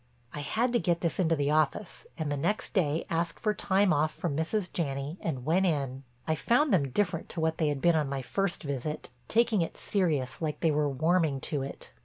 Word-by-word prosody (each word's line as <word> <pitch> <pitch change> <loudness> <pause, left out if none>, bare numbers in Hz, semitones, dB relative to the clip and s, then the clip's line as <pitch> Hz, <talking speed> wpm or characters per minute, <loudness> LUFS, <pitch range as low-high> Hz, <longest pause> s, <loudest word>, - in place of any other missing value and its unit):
I 150 - -5
had 230 - 0
to 240 - +4
get 170 -4 0
this 170 +1 -1
into 165 -3 +3
the 145 -1 0
office 155 +6 0
and 155 -3 -2
the - - +1
next 205 +10 -1
day 160 -6 +1
asked 165 0 -1
for 215 -2 +1
time 190 -1 +2
off 155 +2 +2
from 160 -3 -3
Mrs. 175 +5 -1
Janney 140 0 -3
and 130 -6 -3
went 185 +5 +3
in. 135 -5 -1 0.3
I 160 - +2
found 245 - +2
them 140 -7 +3
different 175 +4 -1
to 175 - -5
what 160 0 0
they 155 - +2
had 145 -2 -1
been 170 -1 +5
on 150 -3 +1
my 135 -1 -3
first 195 +8 -1
visit, 140 0 -4 0.2
taking 230 -3 +3
it 165 - -3
serious 150 - 0
like 155 -2 -2
they 165 - +3
were 150 -1 +1
warming 160 0 +2
to 145 -3 -2
it. 135 - -7
160 Hz, 220 wpm, -29 LUFS, 145-185 Hz, 0.3 s, been